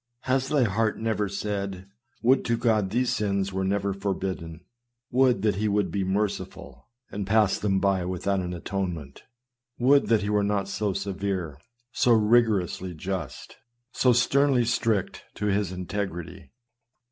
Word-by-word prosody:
Has 135 +1 0
thy 145 -4 +3
heart 110 0 0
never 110 -2 -1
said, 100 -1 -4 0.2
" 120 - -39
Would 130 +3 +4
to 115 -1 +1
God 110 -4 +1
these 120 +4 +1
sins 100 -2 -1
were 95 0 -1
not 100 0 -1
forbid 95 -1 -2
den! 80 0 -10 0.5
Would 125 -5 +3
that 105 -3 +2
he 105 +1 0
would 100 -4 +1
be 100 +2 -1
merciful 100 +2 -3 0.2
and 100 -1 -4
pass 105 -1 +3
them 95 -2 +1
by 95 -2 +1
without 95 +2 -1
an 90 -1 -3
atonement! 85 -5 -4 0.6
Would 140 +3 +4
that 110 -3 +3
he 100 - -2
were 105 -1 +3
not 100 -1 0
so 100 0 -1
severe, 95 -6 -3 0.3
so 120 - +3
rigorously 105 -5 +2
just, 85 -5 -5 0.3
so 125 0 +3
sternly 130 +1 +3
strict 115 -4 0
to 105 - -3
his 100 -2 0
integ 95 +2 -3
rity." 85 +1 -9
100 Hz, 160 wpm, -26 LUFS, 95-110 Hz, 0.6 s, Would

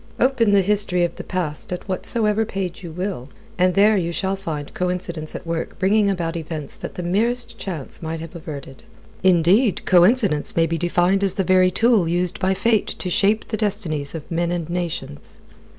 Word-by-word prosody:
Open 250 -4 +3
the 200 -1 +4
history 200 -3 +1
of 170 -1 -1
the - - -6
past 170 -4 -4
at 180 +3 -5
whatsoever 210 +3 +1
page 190 -4 -4
you 170 - -7
will, 180 -6 -4 0.3
and 180 0 +3
there 210 +2 +5
you 170 -3 0
shall 190 +2 -1
find 155 -7 -6
coincidence 180 -3 -3
at - - -7
work 165 -1 -4
bringing 200 +2 +3
about 170 -3 -2
events 155 -3 -5
that - - -7
the 180 - -4
merest 235 +7 0
chance 165 -8 -6
might 160 0 -4
have 165 +2 -9
averted. 145 -5 -8 0.4
Indeed, 185 +5 +3
coincidence 185 - +3
may 165 - +4
be 165 0 -2
defined 175 +3 +2
as 195 - 0
the 195 - 0
very 185 0 +4
tool 220 -1 +3
used 175 +1 -1
by 190 0 +1
Fate 220 +2 +2
to 180 - -4
shape 210 +4 +2
the 215 - -2
destinies 175 -9 -1
of 160 +2 -8
men 170 +1 0
and 170 -3 -2
nations. 170 - -5
180 Hz, 185 wpm, -21 LUFS, 165-200 Hz, 0.4 s, there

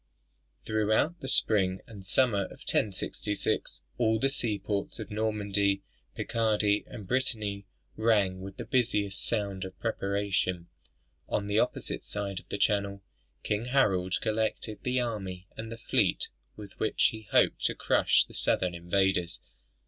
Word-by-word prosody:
Throughout 110 +10 +2
the 135 - -6
spring 95 -7 +2
and 105 -4 -11
summer 105 -1 +2
of - - -12
1066, 105 - -1 0.2
all 110 -1 +3
the 135 +4 +2
seaports 105 -6 -2
of 110 -4 -7
Normandy, 100 -2 +1 0.3
Picardy, 105 -3 +1
and 105 -5 -9
Brittany 105 -5 -1 0.3
rang 105 -5 +2
with 95 0 -8
the - - -5
busy 115 -5 +2
sound 100 0 -2
of 95 0 -8
preparation. 100 -5 -1 0.6
On 100 - 0
the 105 +1 +2
opposite - - -1
side 100 -2 -4
of - - -20
the - - -2
Channel, 100 -1 +1 0.4
King 105 +2 -1
Harold 100 -9 +2
collected 110 0 -1
the 125 0 +1
army 95 -6 -3
and 110 +1 -6
the 115 - -6
fleet - - +1 0.3
with 105 -2 -11
which 110 - +3
he 110 -1 -9
hoped - - +3
to - - +2
crush - - +3
the - - -16
southern 90 -1 +1
invaders. 90 0 +1
105 Hz, 140 wpm, -29 LUFS, 95-110 Hz, 0.6 s, all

